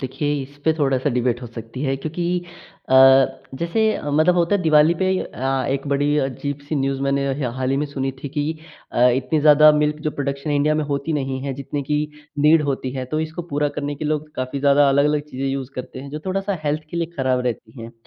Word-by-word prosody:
देखिए, 140 +3 -2
इस 140 +2 -12
पे 160 - +4
थोड़ा-सा 135 0 +1
डिबेट 125 0 0
हो - - -5
सकती 115 +2 -8
है 135 -2 0
क्योंकि 175 +4 -2 0.5
अ, - - +4 0.6
जैसे 170 +9 -1 0.3
मतलब 155 +5 +3
होता 175 +3 +2
है, 200 - +1
दिवाली 155 0 +5
पे 190 - +2
अ, 135 -3 -2
एक 140 +1 -2
बड़ी 145 +1 +1
अजीब-सी 145 +2 -3
न्यूज़ 135 0 -1
मैंने 140 0 +1
ह 125 -4 -1
हाल 130 0 -1
ही 135 - +1
में 145 - 0
सुनी 135 -2 -3
थी 145 - -4
कि 145 +1 -2 0.5
अ, 125 +1 +5
इतनी 150 +4 0
ज़्यादा 150 0 +7
मिल्क 150 0 +1
जो 150 - +1
प्रोडक्शन 140 +1 -3
इंडिया 145 +1 +2
में 155 0 0
होती 140 +2 -2
नहीं 135 -3 -2
है, 140 - -2
जितने 140 +1 -4
की 150 +2 0 0.4
नीड 150 +2 +5
होती 135 -2 -2
है। 130 -1 -4
तो 155 +5 -2
इसको 160 +2 -4
पूरा 145 +1 +1
करने 145 0 -4
के 150 - -7
लिए 150 - 0
लोग 150 0 -2
काफ़ी 130 +2 -3
ज़्यादा 140 0 +5
अलग-अलग 145 +2 +3
चीज़ें 135 +2 -3
यूज़ 135 -1 -3
करते 130 0 -7
हैं, 140 +1 -8
जो 150 - -5
थोड़ा-सा 195 0 -1
हेल्थ 150 +1 0
के - - -5
लिए 170 -1 0
ख़राब 130 -1 +1
रहती 120 +1 -5
हैं। 115 +1 -9
145 Hz, 225 wpm, -21 LUFS, 135-150 Hz, 0.6 s, ज़्यादा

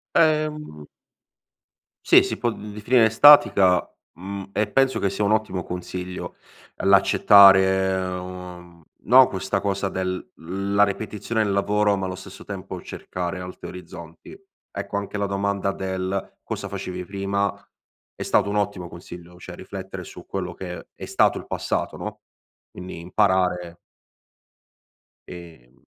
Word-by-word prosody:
Ehm 150 - +1 1.2
Sì, - - +7
si - - -3
può 120 - 0
d - - -9
definire 110 +1 +3
statica, 100 -9 +6 0.3
mhmm, 95 +3 -7
e 105 - 0
penso 135 +3 +2
che 100 - +1
sia 100 +2 -3
un 100 - +2
ottimo 110 -4 0
consiglio 90 +1 -6 0.4
l'accettare, 95 -1 +6
uhm, 90 -2 -7 0.2
no, 130 +4 +7
questa 95 -6 -2
cosa 100 0 -1
del 95 -1 -4
la 100 +4 -1
ripetizione 105 +2 -1
del 100 - -1
lavoro 105 +1 +2
ma 95 -1 -3
allo 90 - -5
stesso 95 - -11
tempo - - -7
cercare 90 +1 -5
altri 90 0 -8
orizzonti. 85 - -11 0.4
Ecco 100 0 -5
anche 100 +1 -4
la 100 0 -1
domanda 100 0 -1
del 95 0 -4
"cosa - - -5
facevi 90 0 -5
prima?" 100 +1 -2 0.6
È - - -5
stato 100 - +2
un 105 - -2
ottimo 100 -4 -2
consiglio, 85 0 -12
cioè 90 0 -10
riflettere 95 0 -8
su - - -12
quello - - -4
che 90 -2 -8
è - - -8
stato - - +2
il - - -11
passato, - - -3
no, - - -7 0.5
quindi 90 -2 -8
imparare 90 -2 0 1.5
Ehm 80 -8 -13
95 Hz, 135 wpm, -23 LUFS, 90-100 Hz, 1.5 s, Sì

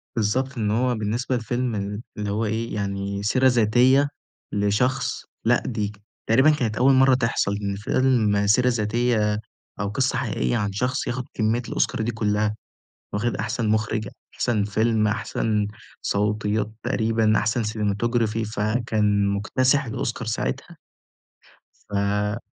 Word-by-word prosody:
بالضبط 125 +5 0
إن 105 -2 0
هو 125 +2 +1
بالنسبة 115 +4 -1
لفيلم 120 0 -2
ال 100 +2 -3 0.2
اللي 105 -1 -3
هو 110 +2 -1
إيه 110 +2 -2
يعني 100 0 -3
سيرة 130 +5 +3
ذاتية 125 +4 +4 0.4
لشخص 105 +6 0 0.2
لأ، - - +3
دي 105 -4 -2 0.4
تقريبًا 130 +7 +5
كانت 120 -8 0
أول 135 +2 +5
مرة 130 0 +5
تحصل 115 -5 0
إن 100 -1 -2
فيلم 105 -2 +2
سيرة 125 +5 +4
ذاتية 110 -2 +1 0.4
أو 105 - -1
قصة 130 +5 0
حقيقية 60 0 0
عن 100 -1 -1
شخص 125 +7 -1
ياخد 125 +1 -2
كمية 110 +2 +1
الأوسكار - - 0
دي 120 +2 -1
كلها، 105 -1 0 0.6
واخد 115 +3 0
أحسن 115 -3 -2
مخرج، 110 -1 0 0.3
أحسن 110 -4 0
فيلم 110 +1 +1
أحسن 105 -1 -1 0.3
صوتيات 105 +1 0
تقريبًا 110 -3 +2
أحسن 115 +3 0
cinematography 110 +1 0
فكان 105 -2 +1
مُكتسح 130 +8 +1
الأوسكار 120 +1 -3
ساعتها. 140 +8 -3 1.1
ف 105 +2 0
110 Hz, 130 wpm, -24 LUFS, 105-120 Hz, 1.1 s, تقريبًا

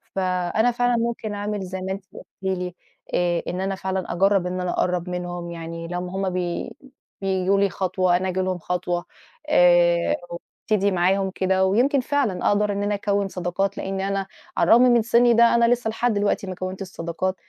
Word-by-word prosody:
فأنا 185 +5 +1
فعلًا 245 0 +1
ممكن 230 -2 -2
أعمل 205 0 -3
زَي 190 0 -5
ما 190 +1 -3
أنتِ 190 0 -5
قُلتِ - - -11 0.2
لي 180 -2 -2 0.4
آآ، 175 -1 +1
إن 180 - -3
أنا 195 0 -1
فعلًا 190 -1 -3
أجرّب 195 +1 +2
إن 180 0 -3
أنا 180 -1 -1
أقرّب 180 0 -1
منهم، 175 -1 -5
يعني 165 0 -6
لمّا 180 +1 -4
هُم 195 0 0
بي 180 -1 -3 0.5
بييجوا 190 0 +1
لي 200 0 +3
خطوة 185 -1 +1
أنا 185 +1 -2
آجي 185 +1 -2
لهم 185 -1 -1
خطوة 175 0 -2 0.4
آآ، 175 - +4 0.5
وأبتدي 200 -2 +2
معاهم 190 +2 +1
كده، 190 0 +2
ويمْكِن 245 +9 +3
فعلًا 250 -8 0
أقدَر 205 0 +2
إن 200 0 -2
أنا 205 0 0
أكوّن 200 0 0
صداقات، 185 +1 -2
لإن 195 0 -3
أنا 195 0 -2 0.3
على - - +3
الرغم 235 - +8
من 240 -1 +5
سِني 235 +1 +4
ده 235 +1 +5
أنا 235 0 +4
لسه 245 -2 -2
لحد 235 +1 0
دلوقتي 205 -1 0
ما 185 - -5
كوّنتش 185 +1 -5
صداقات، 170 +2 -3
190 Hz, 185 wpm, -23 LUFS, 180-205 Hz, 0.5 s, الرغم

